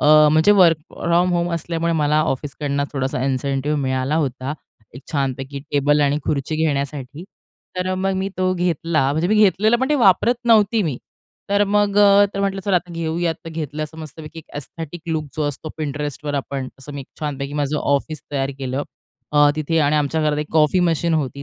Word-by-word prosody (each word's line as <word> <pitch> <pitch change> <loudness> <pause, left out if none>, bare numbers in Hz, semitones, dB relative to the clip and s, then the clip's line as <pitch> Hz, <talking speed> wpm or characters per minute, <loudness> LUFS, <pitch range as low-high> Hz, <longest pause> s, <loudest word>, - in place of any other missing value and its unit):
अ, - - +2 0.3
म्हणजे 160 +6 +5
work 175 -6 +5
from 175 +2 +1
home 175 0 0
असल्यामुळे 170 0 -2
मला 150 -1 +2
ऑफिसकडून 145 -1 -2
थोडासा 130 -2 -2
इन्सेन्टिव्ह 140 +2 -1
मिळाला 130 +2 0
होता 135 -2 -2 0.4
एक 130 - -10
छानपैकी 135 0 -2
टेबल 145 +1 +3
आणि 145 0 +2
खुर्ची 150 +1 -1
घेण्यासाठी. 145 -1 -2 0.5
तर 180 0 -1
अ, - - 0
मग 190 +1 0
मी 190 +1 -1
तो 185 0 +2
घेतला. 165 -5 0
म्हणजे 160 +4 0
मी 215 - +3
घेतलेलं 210 +2 +4
पण 260 - +1
ते - - +4
वापरत 235 -1 +4
नव्हती 220 -1 +4
मी. 150 -9 -2 0.5
तर 200 0 +3
मग 205 0 +1
अ, 200 0 +7
तर 200 - -2
म्हटलं 195 -1 -1
चल 200 - +2
आता 180 0 0
घेऊयात. 165 0 -1
तर 165 - -7
घेतलं 155 -2 -4
असं 160 +1 -12
मस्तपैकी 155 +1 -9
एक 160 - -10
एस्थेटिक 160 +3 -7
लूक 160 -2 -1
जो 155 - 0
असतो 145 +2 -6
Pinterestवर 145 0 -3
आपण 135 -1 -3
असं 135 +2 -10
मी 140 - -5
एक 135 - -11
छानपैकी 140 -2 -4
माझं 145 0 -1
ऑफिस 140 +1 -1
तयार 135 -1 -1
केलं. 135 +1 -2 0.5
अ, 145 -1 +5
तिथे 155 +2 0
आणि 150 0 +2
आमच्या 150 +2 0
घरात 150 -1 +1
एक 150 - -2
कॉफी 155 +3 +3
मशीन 165 +1 0
होती. 140 -2 -2
155 Hz, 190 wpm, -21 LUFS, 140-175 Hz, 0.5 s, अ